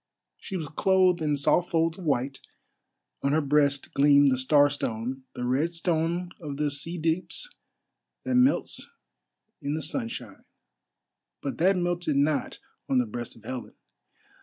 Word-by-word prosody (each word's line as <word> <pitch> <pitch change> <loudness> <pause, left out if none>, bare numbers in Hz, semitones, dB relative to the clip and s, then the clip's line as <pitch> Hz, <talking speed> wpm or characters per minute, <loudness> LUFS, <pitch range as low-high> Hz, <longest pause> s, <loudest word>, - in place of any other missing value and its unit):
She 190 - -5
was 160 -4 -4
clothed 185 +3 +3
in 150 -2 +1
soft 155 +5 +2
folds 165 +1 +1
of 180 - -8
white; 135 -1 0 0.8
on 140 +1 +1
her 155 - +4
breast 145 -1 +1
gleamed 140 0 +5
the - - +3
Starstone, 135 -3 +1
the 125 - -3
red 140 +7 +1
stone 170 +1 -1
of 145 -5 -6
the 150 -1 0
sea 165 +5 -2
deeps 175 - -2 0.7
that 260 - -1
melts 250 +2 +2 0.7
in 145 +1 -2
the 155 - -3
sunshine, 155 - -5 1.0
but 140 - -4
that 185 +3 +4
melted 175 -3 0
not 145 +1 +1 0.3
on 135 - +2
the 125 - +3
breast 120 +2 -6
of 115 - -18
Helen. 125 +2 -6
150 Hz, 145 wpm, -27 LUFS, 140-175 Hz, 1.0 s, gleamed